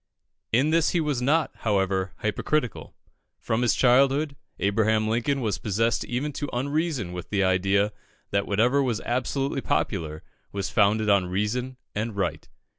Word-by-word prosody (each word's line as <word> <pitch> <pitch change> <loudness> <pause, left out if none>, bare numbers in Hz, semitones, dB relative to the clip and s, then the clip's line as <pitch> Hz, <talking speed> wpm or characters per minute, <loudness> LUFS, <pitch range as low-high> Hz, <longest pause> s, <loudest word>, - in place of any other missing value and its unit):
In 135 +7 +3
this 165 -1 +3
he - - +3
was 150 -5 -1
not, 150 +5 +2
however, 95 -3 0
hypocritical. 120 +3 -1 0.4
From 115 +1 -1
his 120 - +3
childhood, 135 +3 +3 0.2
Abraham 110 +2 +2
Lincoln 120 +5 0
was 110 -4 -1
possessed 115 +3 0
even 140 +5 -2
to 145 +1 -4
unreason 140 - -1
with 90 -1 -7
the 100 -2 +1
idea 95 +3 +2 0.4
that 100 0 0
whatever 120 +7 +3
was 120 -5 0
absolutely 135 +3 -1
popular, 80 -11 -2 0.3
was 100 -1 -3
founded 105 0 +3
on 100 -3 +3
reason 115 +7 -2 0.2
and 110 +1 -3
right. 85 -7 -2
110 Hz, 145 wpm, -26 LUFS, 100-135 Hz, 0.4 s, In